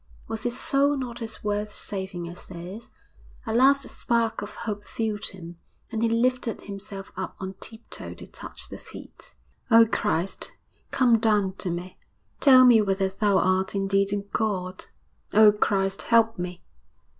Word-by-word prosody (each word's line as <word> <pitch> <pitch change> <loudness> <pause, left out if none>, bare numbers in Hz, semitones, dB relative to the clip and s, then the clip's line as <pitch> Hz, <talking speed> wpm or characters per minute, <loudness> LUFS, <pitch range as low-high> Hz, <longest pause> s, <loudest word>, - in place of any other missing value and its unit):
Was 225 0 -4
his 245 +2 -2
soul 280 +1 +2
not 245 -2 -5
as 220 -1 -6
worth 210 0 -1
saving 190 -4 -4
as 175 +1 -10
theirs? 185 +6 -9 0.6
A 220 - -2
last 275 +3 +4
spark 230 -3 -1
of 205 - -8
hope 205 -2 -5
filled 215 -2 -3
him, 175 -2 -5 0.3
and 220 - -2
he 230 - +2
lifted 235 0 0
himself 195 -1 -8
up 190 0 -5
on 190 0 -5
tip 225 0 -6
toe - - -7
to - - -10
touch - - -9
the - - -8
feet. - - -13 0.3
'Oh, 230 -1 +8
Christ, 195 -5 -2 0.4
come 240 -3 +4
down 210 -4 +2
to 185 - -1
me! 175 +2 -5 0.4
tell 255 -3 +8
me 235 -3 +7
whether 195 -1 +1
Thou 200 0 +2
art 185 +1 +1
indeed 195 0 +1
a 205 - +1 0.2
God. 185 -4 -2 0.5
Oh, 215 0 +8
Christ, 195 -2 0
help 225 -2 +3
me!' 180 0 -5
210 Hz, 160 wpm, -26 LUFS, 190-230 Hz, 0.6 s, Oh